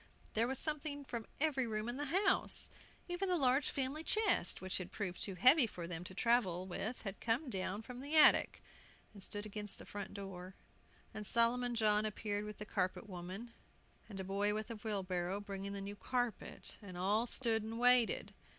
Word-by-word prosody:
There 225 +2 +2
was 265 +1 -1
something 290 -1 -1
from 235 -4 -5
every 275 -5 +1
room 215 0 -2
in 240 +2 -3
the 290 - -2
house! 380 +8 +1 0.4
Even 360 +2 -2
the 360 - +3
large 265 -1 +3
family 275 +3 -2
chest, 435 +4 +3
which 185 0 -1
had 185 -1 -7
proved 185 -4 -4
too 195 - -1
heavy 255 - +7
for 175 -5 -7
them 170 0 -5
to 185 - -9
travel 195 -6 +2
with 205 +6 -3
had 195 -2 -6
come 245 +4 0
down 195 +2 -3
from 250 +2 -8
the 290 +3 -2
attic, 305 - +6 0.5
and 200 - -11
stood 205 +2 -2
against 210 -1 -6
the - - -10
front 200 -1 -7
door. 190 -2 -7 0.6
And 215 - -5
Solomon 235 +3 +2
John 210 -2 +3
appeared 210 -1 -2
with 210 -1 -7
the 210 - -6
carpet 185 +2 -2
woman, 185 +5 -7 0.6
and 195 -3 -7
a - - -3
boy 200 +2 0
with 215 +2 -4
a - - -4
wheelbarrow, 195 -3 -2
bringing 200 -1 -5
the 200 - -4
new 200 +1 -6
carpet. 245 +2 -3
And 185 -4 -9
all 205 +6 +1
stood 230 -3 +3
and 220 +1 -5
waited. 245 -1 +4
215 Hz, 190 wpm, -36 LUFS, 195-250 Hz, 0.6 s, heavy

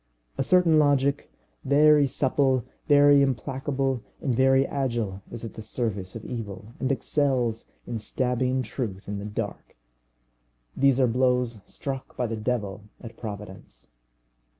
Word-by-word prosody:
A - - -2
certain 175 -4 +4
logic, 140 -1 +2 0.3
very 150 +1 +5
supple, 130 -2 +1 0.2
very 145 -1 +6
implacable, 135 0 -1 0.2
and 135 - -1
very 135 +1 +4
agile, 120 -9 -2
is 115 0 -6
at 115 - -7
the - - -8
service 105 -4 -3
of 115 - -7
evil, 110 -2 -7
and 130 0 0
excels 130 -5 0 0.2
in 115 - -4
stabbing 125 +3 0
truth 105 -5 -5
in 100 0 -4
the 100 - -6
dark. 105 - -5 1.0
These 135 -1 +3
are 130 - +5
blows 125 -2 +1
struck 135 -2 -6
by 125 - 0
the 115 -1 -2
devil 105 -3 -3
at 115 -2 -10
Providence. 100 - -9
125 Hz, 135 wpm, -26 LUFS, 110-135 Hz, 1.0 s, very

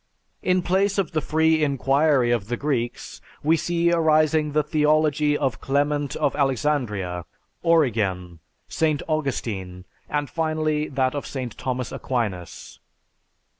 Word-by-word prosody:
In 185 -1 +1
place 195 +3 +1
of 190 -6 0
the 155 - 0
free 160 +1 +2
inquiry 140 -2 +2
of 115 -4 0
the 120 +1 -2
Greeks 125 -5 -3 0.2
we 160 +3 +4
see 170 +1 +1
arising 155 -2 +3
the 150 +1 +2
theology 150 0 +2
of 135 -6 -2
Clement 145 0 0
of 140 - 0
Alexandria, 120 -10 -1 0.4
Origen, 105 - +1 0.3
St. 155 -3 0
Augustine, 105 - -3 0.2
and 145 -1 -1
finally 155 -1 -1
that 130 -2 0
of 145 - -4
St. 130 -5 -5
Thomas 125 -2 -3
Aquinas. 105 -9 -4
145 Hz, 125 wpm, -24 LUFS, 120-155 Hz, 0.4 s, we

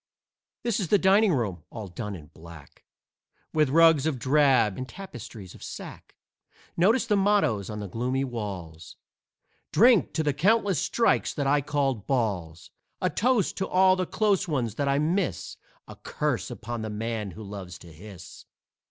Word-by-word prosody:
This 235 -3 0
is 190 - -2
the 205 - +4
dining 200 +2 +4
room, 105 - -2
all 110 -3 -7
done 105 +3 -6
in 75 -4 -13
black, 80 -3 -14 0.7
With 155 -3 +2
rugs 160 -1 +5
of 150 -5 -1
drab 130 -6 +3
and 130 0 -6
tapestries 115 - -10
of - - -15
sack - - -9 0.6
Notice 220 +9 +3
the 215 -3 +1
mottoes 195 - +1
on 105 -1 -5
the 100 - -5
gloomy 125 +7 -2
walls: 95 -10 -6 0.8
"Drink 235 -2 +5
to 160 - 0
the 145 -2 +1
countless 195 +2 +2
strikes 235 - +1
that 145 - -2
I 145 +1 +3
called 135 -6 -1
balls," 95 - -2 0.3
"A - - 0
toast 240 -3 +1
to 190 - -1
all 185 0 +4
the 185 -1 -2
close 205 -4 +1
ones 125 -9 -1
that 140 +5 -2
I 140 0 +2
miss," 155 - -1 0.3
"A - - -10
curse - - -3
upon 120 0 -6
the 110 - -4
man 110 0 -3
who 105 +4 -10
loves 95 -4 -8
to 85 -1 -14
hiss!" 95 +2 -12
130 Hz, 165 wpm, -26 LUFS, -, 0.8 s, rugs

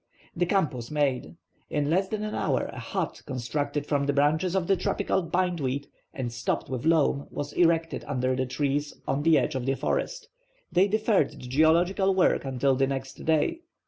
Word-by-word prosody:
The 175 +1 +1
camp 190 -6 +2
was 120 -2 -6
made. 145 -1 -1 0.3
In 145 -1 0
less 190 +3 +2
than 210 +1 -3
an 215 - -3
hour - - 0
a - - -7
hut, - - -3
constructed 145 +3 -2
from 140 -1 0
the 145 - +2
branches 155 +6 +2
of 190 -3 +1
the 195 - +3
tropical 190 - 0
bindweed, 165 -6 -1 0.3
and 120 -3 -4
stopped 115 +3 -2
with 130 +3 -2
loam, 150 -3 +2
was 145 0 -5
erected 165 -1 +2
under 130 -2 0
the 130 0 -1
trees 145 +2 -1
on 135 +2 0
the 160 +1 +5
edge - - 0
of 130 -1 -3
the 135 - +2
forest. - - -2 0.4
They 185 +3 +4
deferred 215 - +2
the - - -14
geological 170 +9 +2
work 185 -6 +3
until 135 +1 +1
the 135 +1 +2
next 135 -1 -5
day. 160 - +2
145 Hz, 185 wpm, -27 LUFS, 135-175 Hz, 0.4 s, the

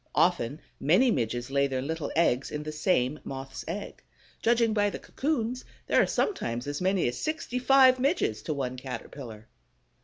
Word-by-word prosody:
Often 155 -5 +2 0.2
many 205 - +4
Midges 120 - -2
lay 140 0 +3
their 130 -1 -2
little 160 0 -3
eggs 140 -6 +2
in 150 0 -4
the 155 - -5
same 150 -3 +1
Moth's 135 0 -6
egg. 195 +5 -5 0.4
Judging 230 -1 +3
by 205 -1 +2
the - - -5
cocoons, 255 -4 -2 0.2
there - - +4
are - - +2
sometimes 120 - -1
as 145 +2 -4
many 190 -3 +2
as 120 - -3
sixty 310 -5 -2
five 260 0 +6
Midges 270 - +1
to 155 - -3
one 130 -2 -3
Caterpillar. 125 -3 -8
155 Hz, 165 wpm, -28 LUFS, -, 0.4 s, five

